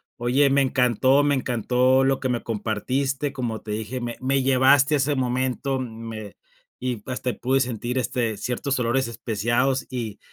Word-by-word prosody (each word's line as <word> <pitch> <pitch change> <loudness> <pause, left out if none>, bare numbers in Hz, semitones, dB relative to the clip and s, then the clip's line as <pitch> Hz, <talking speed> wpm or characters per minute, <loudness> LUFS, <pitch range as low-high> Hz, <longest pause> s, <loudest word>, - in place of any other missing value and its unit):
Oye, 125 +4 +2
me 140 +1 +3
encantó, 130 +1 +3
me 145 -1 +2
encantó 130 +1 +2
lo 135 0 +1
que 130 - -1
me 120 -1 -1
compartiste, 130 +6 -2
como 115 -4 -3
te 105 - -8
dije, 110 +4 -4
me 120 -1 -4
me 135 +1 +1
llevaste 135 +2 +4
a - - +4
ese 145 +2 +1
momento, 130 +1 -1
me 110 -4 -7 0.4
y 125 -4 -3
hasta 125 -1 -3
pude 130 +2 0
sentir, 125 0 -2
este, 115 -3 -1
ciertos 130 +4 -2
olores 125 +1 0
especiados 120 +4 0
y 115 -5 -5
125 Hz, 165 wpm, -24 LUFS, 115-135 Hz, 0.4 s, llevaste